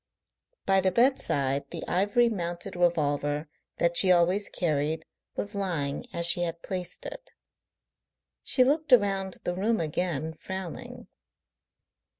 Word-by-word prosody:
By 195 0 +4
the 190 - +3
bedside 140 - +2
the - - -6
ivory 205 +6 +3
mounted 175 -6 -3
revolver 150 -3 +1 0.3
that 170 0 +1
she 185 +1 +5
always 180 +3 +3
carried 155 -1 -1 0.3
was 205 +2 -3
lying 170 -9 -2
as 170 0 -3
she 170 +1 0
had 170 -1 -3
placed 180 -2 -4
it. - - -8 1.1
She 255 - +3
looked 295 +3 +1
around 195 -5 +3
the 175 - -1
room 215 +5 +1
again, 160 -1 -2
frowning. 190 +1 -7
175 Hz, 125 wpm, -28 LUFS, 160-200 Hz, 1.1 s, she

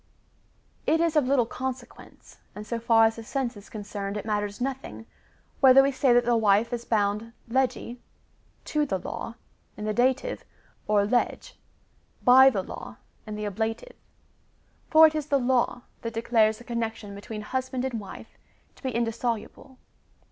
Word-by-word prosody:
It 320 - +3
is 335 -1 +1
of 295 -4 +3
little 260 -3 +3
consequence, 260 +2 -8 0.2
and 210 - -7
so 235 +1 -3
far 225 -1 +5
as 225 +1 0
the 230 - -7
sense 255 0 -3
is 205 0 -13
con 215 -2 -7
cerned 200 0 -5
it 210 - -6
matters 205 -1 -2
nothing, 265 -2 -5 0.5
whether 270 0 +7
we 275 - +2
say 265 -1 +2
that 240 0 +4
the 240 0 +3
wife 220 +1 +3
is 235 0 -4
bound 210 +1 0
legi, 250 0 -1 0.7
{to 300 -1 0
the 190 - -1
law,) 225 +5 -6 0.4
in 210 - -5
the 215 - -1
dative, 260 - 0 0.4
or 205 -1 +3
lege, 245 - -1 0.7
(by 260 +2 +8
the 200 -7 -2
law,) - - -9 0.3
in 215 - -5
the 210 0 -4
ablative. 220 - -3 1.0
For 320 0 +8
it 315 - +4
is 305 -2 -3
the 285 - +3
law 245 -1 +1 0.2
that 230 -1 -5
declares 225 -1 +2
the 240 - -13
connec 235 -2 -3
tion 205 -2 -10
between 210 +1 -7
husband 260 +2 -3
and 245 -4 -3
wife 200 - -11 0.4
to - - -19
be 260 - -2
indissoluble. 235 +2 -3
235 Hz, 170 wpm, -26 LUFS, 215-260 Hz, 1.0 s, by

